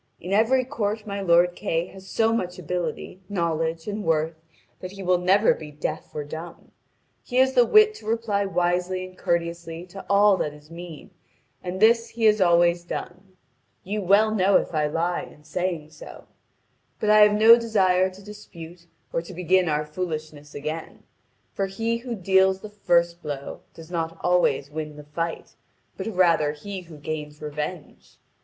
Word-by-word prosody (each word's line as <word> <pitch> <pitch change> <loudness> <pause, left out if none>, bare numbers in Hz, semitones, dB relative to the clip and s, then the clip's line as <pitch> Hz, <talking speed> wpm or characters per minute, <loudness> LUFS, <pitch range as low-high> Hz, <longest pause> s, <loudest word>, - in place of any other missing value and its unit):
In 185 +3 -5
every 240 +5 +3
court 220 -5 -3
my 200 -1 -4
lord 175 -1 +4
Kay 165 +1 -1
has 190 0 -13
so 225 +3 +1
much 180 -5 -2
ability, 180 +1 -4
knowledge, 165 -3 -1
and 210 0 -3
worth 160 -1 +1 0.5
that 185 +1 -8
he 195 -1 -8
will 180 -1 +2
never 190 +4 +4
be 155 - -9
deaf 150 +1 -5
or 150 - -3
dumb. 160 +4 -9 0.5
He 245 - -8
has 260 +1 +4
the 245 -2 +5
wit 430 0 +6
to 215 - -13
reply 220 -3 0
wisely 180 0 0
and 185 0 -13
courteously 170 -1 -2
to 195 +2 -10
all 200 0 +5
that 150 -4 -3
is 150 +2 -18
mean, 170 -2 -10 0.5
and 180 +1 -4
this 230 +2 +4
he 230 - -6
has 215 -2 +5
always 175 -1 +4
done. 185 +2 -7 0.5
You 205 +3 -3
well 205 +3 +4
know 195 -1 +4
if - - -3
I 150 -1 +1
lie 170 +3 -1
in 150 - -13
saying 170 -2 -3
so. - - -12 0.7
But 210 - +2
I 215 - +7
have 210 0 +6
no 225 +2 +9
desire 190 -5 +2
to 190 +1 -14
dispute 170 -5 -11 0.3
or 165 - 0
to 170 +2 -11
begin 180 0 +2
our 150 0 0
foolishness 155 -2 -6
again. 155 +3 -6 0.5
For 195 - -1
he 225 +4 -2
who 240 0 -5
deals 190 0 +3
the 215 - -8
first 175 -4 +1
blow 145 -2 -6
does 165 +1 -12
not 165 -1 -3
always 160 -6 +1
win 155 -1 -5
the 150 - -10
fight, 165 +3 -5 0.4
but - - -5
rather 170 -7 +2
he 190 +5 -7
who 165 -3 -13
gains 150 0 -6
revenge. 150 +2 -7
180 Hz, 175 wpm, -24 LUFS, 165-200 Hz, 0.7 s, no